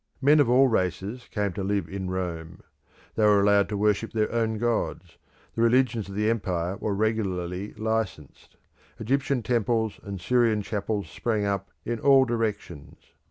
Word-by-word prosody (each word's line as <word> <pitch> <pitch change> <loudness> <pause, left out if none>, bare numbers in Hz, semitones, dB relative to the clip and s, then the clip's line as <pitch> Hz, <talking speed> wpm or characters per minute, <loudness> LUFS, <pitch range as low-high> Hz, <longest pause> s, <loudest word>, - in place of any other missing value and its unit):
Men 145 +3 +5
of 140 -5 +4
all 130 +2 +5
races 105 +2 -2
came 100 -3 -2
to 95 - -4
live 100 -3 -1
in 95 0 -5
Rome; 85 -3 -5 0.5
they 110 - 0
were 105 -1 +5
allowed 100 0 +3
to 105 - -2
worship 105 +1 0
their 110 -1 0
own 115 -2 0
gods; 120 0 -2 0.3
the 115 - -2
religions 115 -3 +2
of 100 - -8
the 105 +1 0
empire 95 -5 -1
were 105 -2 -2
regularly 100 -3 -2
licensed; 110 -9 -4 0.4
Egyptian 135 +2 0
temples 115 -2 0
and 100 -1 -7
Syrian 115 0 +2
chapels 105 0 -3
sprang 110 -3 -2
up 100 -1 -2 0.2
in 120 0 -2
all 135 0 +5
directions. 105 - -4
105 Hz, 160 wpm, -26 LUFS, 100-115 Hz, 0.5 s, Men